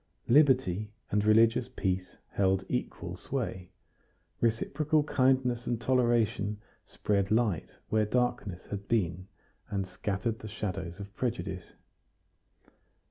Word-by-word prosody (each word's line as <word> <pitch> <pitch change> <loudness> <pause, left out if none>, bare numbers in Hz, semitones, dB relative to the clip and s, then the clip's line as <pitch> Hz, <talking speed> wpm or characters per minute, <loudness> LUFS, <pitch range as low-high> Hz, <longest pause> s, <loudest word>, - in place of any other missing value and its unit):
Liberty 120 - +4 0.2
and 105 0 +2
religious 115 +3 +4
peace 95 -1 -2
held 95 -1 +1
equal - - -3
sway. 90 -1 -4 0.7
Reciprocal 145 +7 +1
kindliness 130 -3 +2
and 120 - 0
toleration 115 -4 +1 0.3
spread 100 -2 0
light 110 -6 +1
where 110 -1 +2
darkness 120 -6 -1
had 100 -1 -5
been, 95 -5 0 0.4
and 100 -2 -1
scattered 100 +4 -3
the 110 - -8
shadows 95 -4 -4
of 100 0 -9
prejudice. 95 -7 -3
105 Hz, 105 wpm, -30 LUFS, 95-120 Hz, 0.7 s, Liberty